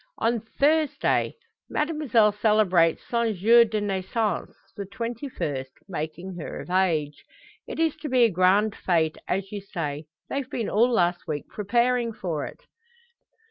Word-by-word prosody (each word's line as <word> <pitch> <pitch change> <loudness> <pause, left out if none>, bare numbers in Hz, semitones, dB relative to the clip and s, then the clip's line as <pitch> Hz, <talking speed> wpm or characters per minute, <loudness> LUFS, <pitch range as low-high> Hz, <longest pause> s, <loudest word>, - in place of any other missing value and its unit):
"On 230 +1 +1
Thursday. 295 +7 +1 0.3
Mademoiselle 300 -9 +2
celebrates 205 -6 +2
son 235 -2 0
jour 230 +6 +6
de 215 -1 -2
naissance 205 +2 -2 0.2
the 205 - -4
twenty 240 +4 -5
first, 140 - -4 0.2
making 175 +1 -5
her 165 - -6
of - - -8
age. 160 -6 +1 0.4
It - - -6
is 325 -2 +2
to 300 - -6
be 255 -1 +4
a 230 - +4
grand 195 +4 +3
fete 160 -3 0
as 195 +1 -2
you 205 -1 -5
say. 155 -6 -5 0.2
They've 275 -2 -3
been 230 - -3
all 230 +4 +4
last 175 -5 +1
week 150 -2 -4
preparing 235 +3 +1
for 165 -8 -3
it." - - -12
210 Hz, 145 wpm, -25 LUFS, 175-235 Hz, 0.4 s, jour